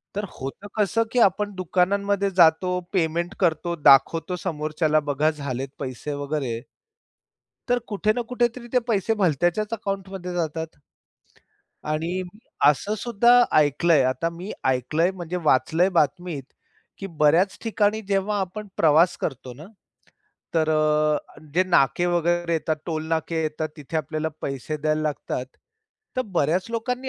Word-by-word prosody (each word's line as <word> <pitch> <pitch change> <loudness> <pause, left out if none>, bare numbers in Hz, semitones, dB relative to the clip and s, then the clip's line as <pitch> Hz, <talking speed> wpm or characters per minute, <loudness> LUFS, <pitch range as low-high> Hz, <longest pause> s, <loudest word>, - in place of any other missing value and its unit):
तर 205 - -2
होतं 135 +10 -7
कसं 215 +2 +2
की 250 - +1
आपण 205 0 +3
दुकानांमध्ये 200 +2 +1
जातो. 180 +2 +4
पेमेंट 170 +1 0
करतो, 170 -1 +1
दाखवतो 165 +4 +4
समोरच्याला 155 -1 0
बघा 150 +3 +2
झालेत 135 -3 -5
पैसे 140 +2 -5
वगैरे. 140 -5 -3 1.1
तर 245 0 +3
कुठे 210 +1 +1
ना 245 - 0
कुठेतरी 240 0 -1
ते - - +6
पैसे 225 +1 +1
भलत्याच्याच 175 +6 +1
अकाउंटमध्ये 195 -4 -4
जातात. 160 -1 -2 1.2
आणि 160 +3 -1 0.6
असंसुद्धा 215 - +1 0.3
ऐकल 150 +4 +1
आहे. 145 -5 +6
आता 150 +6 -1
मी 195 - -6 0.2
ऐकल 130 +5 -2
आहे, 175 +3 +4
म्हणजे 175 +1 -4
वाचलय 165 +8 +3
बातमीत, 150 0 0 0.6
की 195 - -5 0.2
बऱ्याच 170 +6 +4
ठिकाणी 220 -1 +1
जेव्हा 200 +1 +1
आपण 205 +3 -5
प्रवास 160 +3 +4
करतो 130 -3 -4
ना, - - -10 0.9
तर 160 -1 +2
अ, 155 -1 +1
जे 185 - +4
नाके 170 +3 +3
वगैरे 175 0 0
येतात. 160 -1 0
टोल 160 -1 -3
नाके 160 0 -1
येतात. 155 0 -2
तिथे 150 +2 -5
आपल्याला 155 +1 -2
पैसे 135 +3 -4
द्यायला 155 +1 0
लागतात. 130 -3 -4 0.7
तर 255 - +2
बऱ्याच 170 +5 +1
लोकांनी 250 +3 -3
170 Hz, 135 wpm, -24 LUFS, 155-195 Hz, 1.2 s, ते